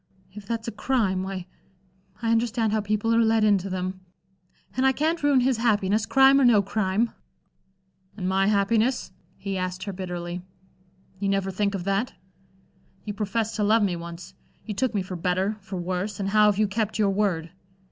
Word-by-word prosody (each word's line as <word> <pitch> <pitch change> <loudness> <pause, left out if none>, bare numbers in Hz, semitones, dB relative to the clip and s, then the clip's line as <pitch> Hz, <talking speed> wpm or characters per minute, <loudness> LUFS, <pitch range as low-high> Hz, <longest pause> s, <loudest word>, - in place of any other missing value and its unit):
"If 205 -1 -10
that's 230 0 -3
a - - -2
crime, 210 -5 0
why 190 -1 -5 0.8
I 225 - +1
understand 230 -1 +1
how 215 - +1
people 215 +2 0
are 230 - +4
led 225 -1 +3
into 200 -2 +2
them. 185 0 -3 0.8
And 255 - +1
I 265 0 +4
can't 320 +5 0
ruin 285 -3 +4
his 255 -1 +2
happiness, 215 -2 +1
crime 270 0 +6
or - - +4
no 225 -5 +5
crime." 205 +2 0 1.1
"And 185 -3 -3
my 190 +1 +2
happiness?" 215 +4 +1 0.3
he 195 -1 -4
asked 185 0 -3
her 200 -1 -5
bitterly. 180 -1 -5 0.8
"You 200 0 -1
never 195 -1 0
think 200 +1 -1
of 185 - -4
that? 195 +5 -1 0.9
You 210 - -3
professed 215 +2 -2
to 210 - +1
love 215 +1 +4
me 190 -3 +1
once. 170 +2 -9 0.3
You 215 - -4
took 235 +3 -1
me 195 - +1
for 185 0 -6
better, 185 +4 0
for 195 0 -7
worse, 185 +4 -3
and 195 -1 -1
how 210 +1 +5
have 205 -2 +2
you 215 0 +3
kept 215 +2 -2
your 205 -2 +2
word? 185 -5 0
205 Hz, 185 wpm, -25 LUFS, 190-225 Hz, 1.1 s, crime